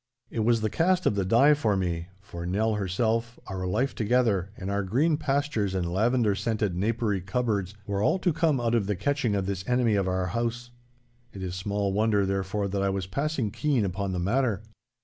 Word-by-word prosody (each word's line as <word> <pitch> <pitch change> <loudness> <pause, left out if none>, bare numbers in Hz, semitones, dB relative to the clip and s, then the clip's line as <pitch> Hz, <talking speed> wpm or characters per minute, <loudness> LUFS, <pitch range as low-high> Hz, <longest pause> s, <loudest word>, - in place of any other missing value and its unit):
It - - -3
was 115 +1 +3
the 110 - 0
cast 185 +2 +2
of - - +3
the 100 -1 0
die 120 +10 +5
for 110 -9 +1
me, 85 -2 -2
for 85 -5 -8
Nell 105 +5 0
herself, 110 +4 -1
our 95 -2 -4
life 130 +9 0
together, 110 -5 +1
and 95 0 -4
our 100 0 0
green 135 - +2
pastures 140 -9 -1
and 85 -2 -1
lavender 115 +2 +2
scented 105 -2 -1
napery 105 0 0
cupboards 100 -1 -1
were 100 -1 -2
all 105 - +3
to 180 -3 +1
come 155 -4 +2
out 120 -1 0
of 110 -5 +1
the 105 - 0
catching 125 +1 0
of 100 -2 0
this 95 -1 -3
enemy 125 -3 +3
of 100 -2 +1
our 95 0 0
house. 120 +1 -2 0.6
It 95 - -7
is 90 -1 -4
small 100 +1 -1
wonder 105 -1 +2
therefore 95 +1 -1
that 100 +1 -1
I 100 - +1
was 95 -1 -2
passing 140 +1 -2
keen 140 -6 +1
upon 95 +1 -2
the 90 - -2
matter. 110 +2 0
105 Hz, 205 wpm, -27 LUFS, 95-120 Hz, 0.6 s, die